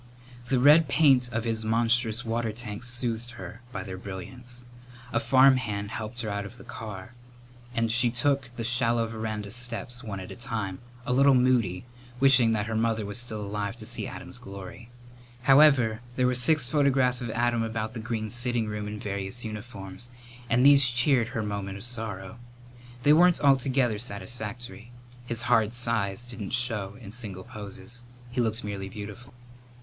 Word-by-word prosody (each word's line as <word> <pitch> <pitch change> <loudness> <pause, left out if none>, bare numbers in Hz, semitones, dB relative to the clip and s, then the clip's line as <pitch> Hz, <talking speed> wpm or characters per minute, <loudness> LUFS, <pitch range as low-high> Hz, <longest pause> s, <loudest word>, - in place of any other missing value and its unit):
The 130 +1 +2
red 150 +4 +7
paint 135 -4 +4
of 115 -1 -2
his 115 -1 -1
monstrous 115 +1 +1
water 115 0 -1
tanks 110 +1 -6
soothed 120 -1 -3
her 115 0 -9
by - - -4
their 95 -2 -7
brilliance. 120 +6 -8 0.5
A 115 - +3
farmhand 120 -5 +3
helped 115 +2 -5
her 110 - -3
out 100 0 -2
of 110 +4 -10
the - - -12
car 105 0 -8 0.6
and 115 -2 +1
she 120 +1 +3
took 130 +2 0
the 115 - -4
shallow 120 -1 +3
veranda 110 -2 -4
steps 120 +1 -1
one 100 -4 -5
at 95 - -8
a - - -7
time, 110 -5 -4 0.3
a 125 - 0
little 135 +1 +5
moody, 120 -7 +2 0.3
wishing 130 -4 +6
that 105 -2 0
her 110 - -4
mother 110 -1 0
was 105 +4 +1
still 110 -3 0
alive 100 0 -3
to - - -9
see - - -2
Adam's - - -8
glory. 100 +4 -10 0.5
However, 135 -5 +5
there 125 - +2
were 125 - +3
six 125 +2 +2
photographs 135 -3 +2
of 120 - -4
Adam 120 +1 +1
about 110 -1 -3
the 120 - -6
green 110 -1 -3
sitting 120 -1 0
room 105 0 -4
in 105 0 -6
various 100 +4 -4
uniforms, 105 -1 -7 0.4
and 125 +3 +3
these 140 -2 +7
cheered 120 0 +3
her 115 -1 -3
moment 100 -2 -4
of 100 - -9
sorrow. 115 -3 -3 0.6
They 145 - +6
weren't 175 +2 +5
altogether 130 -5 +2
satisfactory. 115 +1 -6 0.4
His 120 0 -3
hard 110 0 +3
size 115 -3 -1
didn't 120 -4 -6
show 115 -5 +2
in 105 -5 -10
single 105 -6 -7
poses. 115 +2 -7 0.3
He 125 - 0
looked 115 0 -1
merely 100 -2 -5
beautiful. 105 +6 -9
Mrs. 120 0 -22
115 Hz, 170 wpm, -27 LUFS, 105-125 Hz, 0.6 s, red